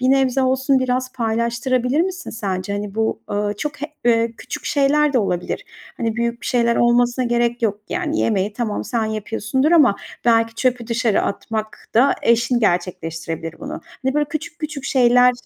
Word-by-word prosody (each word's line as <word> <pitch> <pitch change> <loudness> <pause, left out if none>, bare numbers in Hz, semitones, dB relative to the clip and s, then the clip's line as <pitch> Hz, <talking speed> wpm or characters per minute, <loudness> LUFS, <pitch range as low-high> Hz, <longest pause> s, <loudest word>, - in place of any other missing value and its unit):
bir 255 +1 +3
nebze 270 -1 +3
olsun 265 +1 +2
biraz 255 0 -1
paylaştırabilir 235 +3 0
misin 365 0 -2
sence? 195 -3 -3
Hani, 205 -1 -4
bu, 220 0 0
ııı, 205 0 -1
çok 290 +3 -5
he 300 - 0 0.2
eee, 230 -1 +3
küçük 200 - -7
şeyler 290 +1 +2
de 255 - +3
olabilir. 180 -5 -2 0.3
Hani, 225 -1 -2
büyük 235 0 -1
bir - - -7
şeyler 235 -1 +2
olmasına 240 +1 +3
gerek 240 0 0
yok. 210 -2 0
Yani, 325 -3 -1
yemeği 205 -2 +1
tamam, 220 -1 -2
sen 230 -3 -1
yapıyorsundur 225 +7 -1
ama 275 -12 +5 0.3
belki 230 -1 +3
çöpü 245 -1 0
dışarı 230 -2 +1
atmak 215 +2 -4
da 255 +5 +5
eşin 235 +1 +3
gerçekleştirebilir 165 -3 -2
bunu. - - -6 0.2
Hani, 265 +1 +1
böyle 295 0 +2
küçük 330 +3 -5
küçük 305 -3 -5
şeyler, 250 -1 +5
235 Hz, 165 wpm, -20 LUFS, 220-265 Hz, 0.3 s, ama